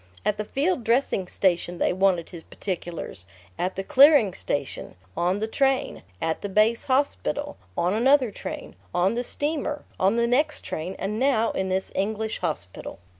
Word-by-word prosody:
At 210 - +1
the 210 - -2
field 285 - 0
dressing 230 -5 +1
station 175 -1 0
they - - +1
wanted 185 -2 +1
his 170 -3 -8
particulars, 170 - -5 0.3
at 185 +1 -1
the 195 - -3
clearing 270 - +6
station, 145 -6 -4 0.2
on 180 +3 +1
the 220 - 0
train, 270 +3 0 0.2
at 160 0 -1
the 205 - -4
base 215 +4 +2
hospital, 285 +2 0 0.2
on 175 +2 +2
another 255 +2 +4
train, - - -7 0.2
on 180 +4 +3
the 240 +1 -1
steamer, 295 +2 -2 0.2
on 195 +4 +3
the 235 0 +2
next 250 +6 +1
train, 175 +5 -4
and 210 +3 -3
now 250 -4 +2
in 190 0 -2
this 190 +1 -1
English 215 +2 -2
hospital. 150 - -4
210 Hz, 165 wpm, -25 LUFS, 185-260 Hz, 0.3 s, clearing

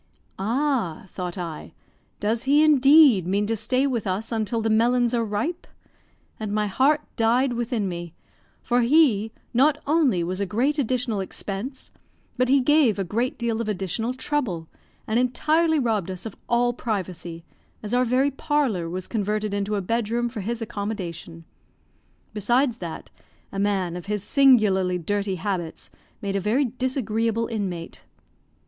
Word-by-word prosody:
"Ah," 235 - 0
thought 180 0 -5
I; 170 -4 -6 0.5
"does 225 +4 -1
he, 290 +3 +5
indeed, 280 - +6
mean 200 +2 +1
to 225 +2 0
stay 255 +5 +1
with 240 -7 -1
us 200 +5 -2
until 225 0 -1
the 225 0 0
melons 240 +2 +3
are 235 -1 +1
ripe?" 225 - -3 0.7
and 215 -2 -4
my 210 0 +1
heart 270 +9 +2 0.2
died 240 +3 +2
within 235 -3 -1
me, 175 -2 -6 0.5
for 245 +1 +2
he 235 -5 +3 0.2
not 280 +5 +4
only 285 - +2
was 185 +3 -3
a 200 - -1
great 260 - 0
additional 245 -4 0
expense, 200 +7 -6 0.4
but 255 0 +1
he 275 0 +5
gave 280 -5 +4
a 195 - 0
great 230 +8 -2
deal 230 -1 -1
of 220 - -3
additional 210 +5 -2
trouble, 250 - -2 0.4
and 220 +2 +1
entirely 310 +6 +2
robbed 220 - 0
us 185 +1 -6
of 220 - -6
all 240 0 +2
privacy, 180 -7 -4 0.4
as 210 +2 -5
our 250 +1 +4
very 255 +3 +2
parlour 265 - 0
was 185 +1 -4
converted 210 -1 -2
into 205 +1 -1
a 200 - -1
bed 230 +2 -1
room 240 +1 0
for 225 -3 -6
his 230 +3 -3
accommodation; 185 -6 -6 0.9
besides 240 +4 +1
that, 170 -3 -7 0.4
a 195 - -4
man 195 -4 0
of 180 +2 -7
his 210 -1 -2
singularly 210 -10 +4
dirty 200 +3 -2
habits 175 -2 -4 0.3
made 200 -1 -2
a - - +2
very 220 +9 +1
disagreeable 230 -3 -1
inmate. 195 -7 -5
225 Hz, 155 wpm, -24 LUFS, 195-255 Hz, 0.9 s, indeed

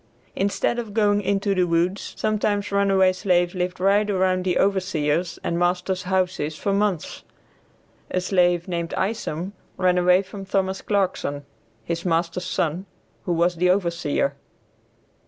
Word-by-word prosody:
Instead 200 +4 0
of 215 -3 -6
going 205 -2 +3
into 200 0 0
the 185 -2 +2
woods, 175 +3 -1
sometimes 205 -1 0
runaway 195 -2 +3
slaves 175 -2 +1
lived 180 -1 -3
right 200 +3 +3
around 185 -2 +1
the 180 -1 +1
overseer's 175 -4 0
and 170 - -1
master's 180 +1 0
houses 185 -5 -1
for 200 +5 -1
months. 200 -4 -1 0.9
A 185 - 0
slave, 175 -1 +2
named 170 -2 -3
Isom, 190 -3 -2 0.2
ran 180 -1 +3
away 180 +2 +4
from 195 +1 -9
Thomas 190 0 -1
Clarkson, 180 -8 -1 0.4
his 170 0 -3
master's 170 +1 0
son, 170 +4 -2 0.4
who 175 - 0
was 170 +1 +1
the 180 +2 +2
overseer. 170 -7 0
185 Hz, 135 wpm, -23 LUFS, 175-195 Hz, 0.9 s, away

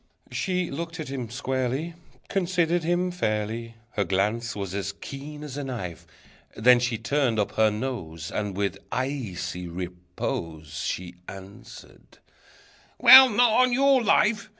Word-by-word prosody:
She 180 -2 -1
looked 165 +4 -5
at 155 - -5
him 130 -4 -5
squarely, 130 +5 -2 0.3
Considered 175 -3 0
him 175 +2 0
fairly, 115 -6 -2 0.2
Her 100 - 0
glance 105 +5 -1
was 100 -3 -5
as 100 0 -3
keen 145 +7 -9
as 145 -2 -7
a 145 - -3
knife, 105 -11 -6 0.5
Then 125 +3 +5
she 120 -1 -1
turned 120 +1 0
up 105 - 0
her 110 0 +3
nose, 105 -9 -5
And, 105 -2 -3
with 100 -1 -1
icy 120 -9 -3
repose, 85 -3 -5
She 90 -1 -4
answered: 95 +1 -12 0.8
"Well, 260 +2 +10
not 240 +1 +4
on 250 +2 +4
your 270 -1 +4
life! 210 -1 +2
125 Hz, 135 wpm, -26 LUFS, -, 0.8 s, Well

